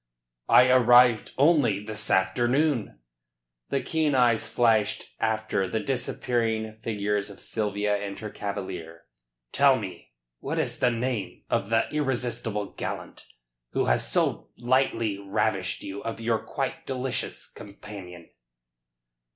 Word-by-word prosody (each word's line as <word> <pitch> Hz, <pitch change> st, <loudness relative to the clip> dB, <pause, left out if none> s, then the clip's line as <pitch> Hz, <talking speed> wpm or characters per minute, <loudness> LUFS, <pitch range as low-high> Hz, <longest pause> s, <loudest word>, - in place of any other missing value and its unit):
"I 125 Hz, -, +7 dB
arrived 125 Hz, -2 st, +5 dB
only 140 Hz, -, +4 dB
this 105 Hz, 0 st, -3 dB
afternoon." 125 Hz, -, +1 dB, 0.7 s
The 135 Hz, -, -1 dB
keen 155 Hz, -3 st, +1 dB
eyes 120 Hz, -3 st, +3 dB
flashed 110 Hz, -3 st, +1 dB
after 110 Hz, -3 st, 0 dB
the 100 Hz, +5 st, -1 dB
disappearing 115 Hz, -2 st, -1 dB
figures 105 Hz, -2 st, -1 dB
of 100 Hz, -, -11 dB
Sylvia 105 Hz, -1 st, -1 dB
and 100 Hz, -1 st, -5 dB
her 105 Hz, -1 st, -7 dB
cavalier. 95 Hz, -5 st, -6 dB, 0.5 s
"Tell 140 Hz, -2 st, +5 dB
me, 90 Hz, -, -8 dB, 0.3 s
what -, -, -4 dB
is -, -, -1 dB
the 125 Hz, -, +4 dB
name 120 Hz, -4 st, -3 dB
of 100 Hz, -, 0 dB
the 115 Hz, 0 st, +2 dB
irresistible 120 Hz, -7 st, -2 dB
gallant -, -, -6 dB, 0.5 s
who -, -, +1 dB
has -, -, +1 dB
so -, -, 0 dB
lightly 120 Hz, -4 st, +1 dB
ravished 100 Hz, -2 st, -1 dB
you 100 Hz, +1 st, -6 dB
of 115 Hz, 0 st, -4 dB
your 115 Hz, -1 st, 0 dB
quite -, -, -4 dB
delicious 130 Hz, -1 st, -3 dB
companion?" 100 Hz, -4 st, -11 dB
110 Hz, 120 wpm, -26 LUFS, 100-125 Hz, 0.7 s, I